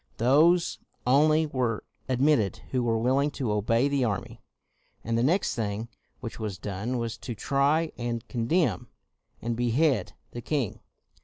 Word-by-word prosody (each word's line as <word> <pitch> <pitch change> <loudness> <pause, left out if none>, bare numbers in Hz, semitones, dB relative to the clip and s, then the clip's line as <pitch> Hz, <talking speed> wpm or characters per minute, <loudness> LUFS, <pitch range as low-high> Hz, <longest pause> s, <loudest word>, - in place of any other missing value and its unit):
Those 155 +9 +4 0.3
only 155 +5 +4
were 125 -7 -1 0.3
admitted 130 - +2
who 130 - +1
were 115 -2 +1
will 125 +4 +2
ing 145 +1 +2
to 125 -6 -1
obey 115 +5 +2
the 140 -2 +1
army. 100 -5 -3 0.6
And 115 +1 -1
the 115 - +2
next 170 +10 +2
thing 110 0 -3 0.3
which 115 -3 -7
was 105 -4 -4
done 105 +6 -3
was 115 -2 -3
to 120 - -6
try, 140 +8 +1
and 120 -1 -3
condemn, 125 +1 0 0.6
and 115 0 -1
behead 120 +2 +1 0.2
the 120 - -6
king. 130 -3 -2
120 Hz, 150 wpm, -27 LUFS, 115-140 Hz, 0.6 s, Those